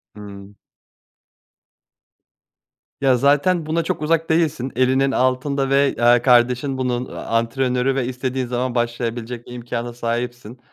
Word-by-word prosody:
Hımm. 100 -1 -11 2.5
Ya 135 -2 +4
zaten 145 +6 +2
buna 165 +2 0
çok - - -3
uzak 165 +1 0
değilsin, 155 -6 0
elinin 130 +2 +2
altında 135 +2 0
ve, 140 0 +3
eee, 120 0 +4
kardeşin 125 +2 +3
bunun, 125 -1 -1
eee, - - -13
antrenörü 125 +3 -1
ve 135 -2 0
istediğin 130 +1 -3
zaman 125 0 -2
başlayabilecek 120 0 -3
imkâna 120 0 -5
sahipsin. 120 0 -4
125 Hz, 115 wpm, -20 LUFS, 120-135 Hz, 2.5 s, Ya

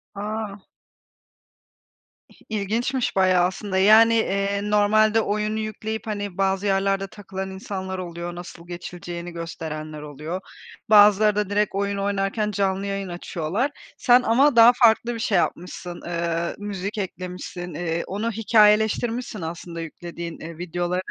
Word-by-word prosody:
A! 210 0 -4 1.7
İh - - -22
ilginçmiş 225 +5 -1
bayağı 185 -2 +4
aslında, 190 +1 -3
yani, 220 +4 +7
eee, 200 -2 0
normalde 215 +1 +4
oyunu 210 +1 -1
yükleyip, 220 +1 -4
hani, 205 -3 -4
bazı 195 +1 +1
yerlerde 195 0 +1
takılan 190 -2 -7
insanlar 190 -1 -5
oluyor, 175 0 -6
nasıl 175 -1 -10
geçileceğini 175 0 -7
gösterenler 155 -2 -6
oluyor. 150 +5 -6 0.5
Bazıları 210 0 +6
da 210 -2 0
direkt 205 -1 0
oyun 200 0 -1
oynarken 200 +2 -1
canlı 195 0 0
yayın 195 -1 -3
açıyorlar. 175 - -2 0.3
Sen 245 0 +5
ama 260 +3 +3
daha 230 +1 +9
farklı 235 0 +4
bir 230 - -6
şey 210 -5 +1
yapmışsın, 175 0 -3
eee, 170 0 -2
müzik 205 0 -5
eklemişsin, 180 -2 -6
eee, 165 +1 -2
onu 215 +4 -2
hikâyeleştirmişsin 220 +1 +2
aslında 170 +1 -6
yüklediğin, 170 +1 -7
eee, 165 0 -8
videoları. 175 +1 -2
195 Hz, 130 wpm, -24 LUFS, 175-215 Hz, 1.7 s, daha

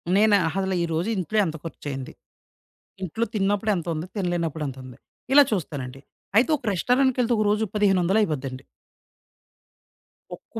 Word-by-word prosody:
నేను 210 0 +5
అహ 160 - -4 0.2
ద - - +1
ఈ - - +1
రోజు 170 +7 -1
ఇంట్లో 190 +4 -2
ఎంత 160 -1 -3
ఖర్చయింది. 135 -5 -6 0.9
ఇంట్లో 200 +6 -1
తిన్నప్పుడెంతుంది? 195 -5 0
తినలేనప్పుడెంతుంది? 155 - -3 0.4
ఇలా 290 0 +9
చూస్తానండి. 135 -9 -4 0.4
అయితే 255 +7 +4
ఒక - - -27
రెస్టారెంట్‌కెళ్తే 250 +3 +2
ఒక 215 - +2
రోజుకి 210 -1 0
పదిహేనొందలైపోద్దండి. 180 -9 +1 1.7
ఒక్క - - -10
185 Hz, 115 wpm, -24 LUFS, 155-215 Hz, 1.7 s, ఇలా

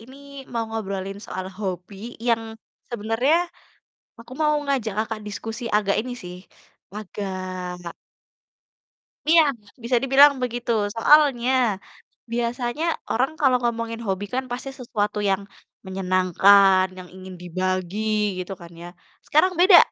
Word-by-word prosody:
Ini 255 +4 -14 0.4
mau 230 -1 -1
ngobrolin 195 -3 -4
soal 185 -2 -5
hobi 190 0 -6 0.2
yang 225 -1 0 0.4
sebenarnya 230 +7 +1 0.8
aku 230 +2 -13
mau 300 +1 +2
ngajak 255 -7 0
Kakak 220 0 -2
diskusi 225 +3 -6
agak 205 -1 +2
ini 250 +1 -6
sih, 180 0 -8 0.5
wah 210 +2 -6
agak 185 -3 -5 1.4
Iya, 330 0 +8 0.4
bisa 240 +2 +1
dibilang 275 +2 +7
begitu. 245 -1 -2 0.2
Soalnya, 265 -1 +5 0.8
biasanya 240 +5 -1 0.3
orang 255 +6 +1
kalau 260 -3 +5
ngomongin 230 -1 -2
hobi 195 +1 -1
kan 260 +1 0
pasti 255 +2 -4
sesuatu 210 -4 -2
yang 195 0 +1 0.4
menyenangkan, 190 +1 +4
yang 185 -1 -9
ingin 185 0 -10
dibagi 185 +2 -2 0.4
gitu 185 +2 -5
kan 170 0 -11
ya. 175 - -8 0.4
Sekarang 340 +5 +3
beda, 370 0 +9
220 Hz, 120 wpm, -23 LUFS, 190-245 Hz, 1.4 s, beda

